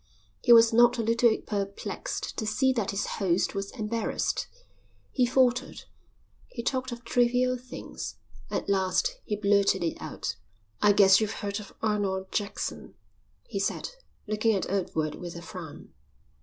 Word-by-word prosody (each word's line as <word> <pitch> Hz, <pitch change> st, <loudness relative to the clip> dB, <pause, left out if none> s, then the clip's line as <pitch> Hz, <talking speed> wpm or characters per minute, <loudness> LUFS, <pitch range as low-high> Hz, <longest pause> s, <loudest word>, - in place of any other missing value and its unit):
He 245 Hz, -, +4 dB
was 230 Hz, 0 st, +8 dB
not 240 Hz, +1 st, +6 dB
a 230 Hz, -, 0 dB
little 230 Hz, 0 st, +3 dB
perplexed 200 Hz, -1 st, -4 dB
to 220 Hz, -, -2 dB
see 260 Hz, +5 st, +2 dB
that 225 Hz, -6 st, -1 dB
his 200 Hz, -, -1 dB, 0.2 s
host 185 Hz, -1 st, +1 dB
was 195 Hz, 0 st, -3 dB
embarrassed. 225 Hz, -1 st, -2 dB, 0.6 s
He 250 Hz, -2 st, +2 dB
faltered. 255 Hz, 0 st, +1 dB, 0.6 s
He 235 Hz, -, -7 dB
talked 260 Hz, +1 st, -1 dB
of 240 Hz, 0 st, -7 dB
trivial 250 Hz, +1 st, +2 dB
things. 250 Hz, 0 st, -7 dB, 0.3 s
At -, -, -3 dB
last 200 Hz, -, +1 dB
he 210 Hz, -, -1 dB
blurted 200 Hz, -2 st, +2 dB
it 165 Hz, -, -2 dB
out. -, -, -4 dB, 0.4 s
"I 205 Hz, -, +6 dB
guess 195 Hz, 0 st, +6 dB
you've 215 Hz, -, -1 dB
heard 200 Hz, +1 st, -2 dB
of 205 Hz, -, -11 dB
Arnold 195 Hz, -3 st, -1 dB
Jackson," 205 Hz, -1 st, -4 dB, 0.5 s
he -, -, -3 dB
said, -, -, -2 dB, 0.3 s
looking 215 Hz, +1 st, +1 dB
at 190 Hz, -, -1 dB
Edward 160 Hz, -6 st, -1 dB
with 175 Hz, -1 st, -7 dB
a 170 Hz, -, -7 dB
frown. -, -, -9 dB
215 Hz, 150 wpm, -28 LUFS, 200-240 Hz, 0.6 s, was